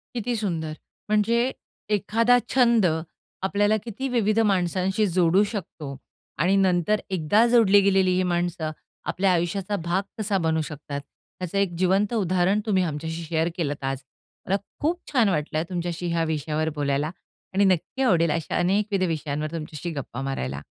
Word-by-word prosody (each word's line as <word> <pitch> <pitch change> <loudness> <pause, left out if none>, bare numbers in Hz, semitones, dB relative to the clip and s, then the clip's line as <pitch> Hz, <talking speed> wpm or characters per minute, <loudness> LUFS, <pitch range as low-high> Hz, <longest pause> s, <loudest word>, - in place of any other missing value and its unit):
किती 240 +1 -1
सुंदर. 160 -6 -2 0.4
म्हणजे 215 +2 +3 0.6
एखादा 230 +4 +3 0.2
छंद 235 -5 +4 0.6
आपल्याला 205 +2 +2
किती 240 +4 -4
विविध 225 -3 +2
माणसांशी 190 +3 +1
जोडू 180 +2 +4
शकतो 155 -8 -6 0.5
आणि 190 +3 +3
नंतर 190 +1 +2
एकदा 190 +5 +3
जोडली 220 -4 +6
गेलेली 190 -1 +3
ही 185 - +2
माणसं 175 -2 -1 0.4
आपल्या 190 0 +2
आयुष्याचा 180 +3 0
भाग 180 +3 +1
कसा 210 -2 0
बनू 160 0 +2
शकतात, 145 -2 -6 0.4
त्याचं 180 +1 -3
एक 195 -3 +1
जिवंत 190 +4 +2
उदाहरण 185 -1 +2
तुम्ही 190 -4 +2
आमच्याशी 160 +1 -4
शेअर 160 +1 0
केलत 145 -4 -2
आज. 135 0 -2 0.5
मला 195 - +2 0.2
खूप 335 +4 0
छान 235 -6 +4
वाटलं 155 -3 -1
आहे 160 - 0
तुमच्याशी 175 -1 -3
ह्या 165 -1 +1
विषयावर 155 +1 -1
बोलायला 145 +1 0 0.4
आणि 200 +1 +3
नक्की 190 +7 0
आवडेल 170 -9 +3
अशा 165 0 -2
अनेकविध 195 +2 +1
विषयांवर 155 -2 -3
तुमच्याशी 160 0 -5
गप्पा 130 -1 -6
मारायला. 70 - -3
180 Hz, 145 wpm, -25 LUFS, 160-205 Hz, 0.6 s, जोडली